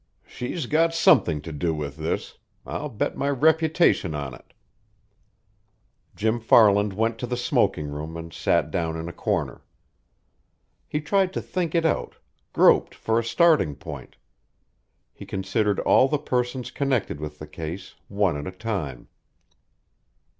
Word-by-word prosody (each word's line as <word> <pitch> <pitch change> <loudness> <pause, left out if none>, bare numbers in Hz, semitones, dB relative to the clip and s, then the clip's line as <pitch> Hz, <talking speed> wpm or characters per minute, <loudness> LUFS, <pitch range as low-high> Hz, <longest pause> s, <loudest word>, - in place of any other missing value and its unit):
"She's 130 +5 -5
got 165 +5 +2
something 85 - +4
to 80 - -8
do 80 +2 -1
with 70 -2 -5
this. 80 +1 -4 0.3
I'll 150 - -4
bet 110 - -2
my 140 - -1
reputation 160 - +2
on 70 -3 -4
it." - - -16 1.6
Jim 110 +2 0
Farland 105 -3 +5
went 115 +3 -1
to 125 - -3
the 125 +1 -2
smoking 100 -10 +1
room 75 +3 -6
and 85 -1 -8
sat - - +1
down 80 -3 -2
in 80 +1 -5
a 85 - -6
corner. - - -2 1.3
He 150 - -2
tried 190 +4 +1
to - - -2
think 175 -3 -2
it 165 -1 +2
out, 160 - 0 0.4
groped - - +4
for 115 +1 0
a - - -2
starting 150 - +3
point. 70 - -9 1.0
He - - -11
considered 100 +2 -1
all 130 - +5
the 150 - 0
persons 125 -2 -2
connected 130 - -1
with 75 0 -6
the 75 - -8
case, 80 +5 -7
one 100 -5 +1
at 75 - -6
a 95 0 -8
time. 85 - -4
105 Hz, 145 wpm, -24 LUFS, -, 1.6 s, Farland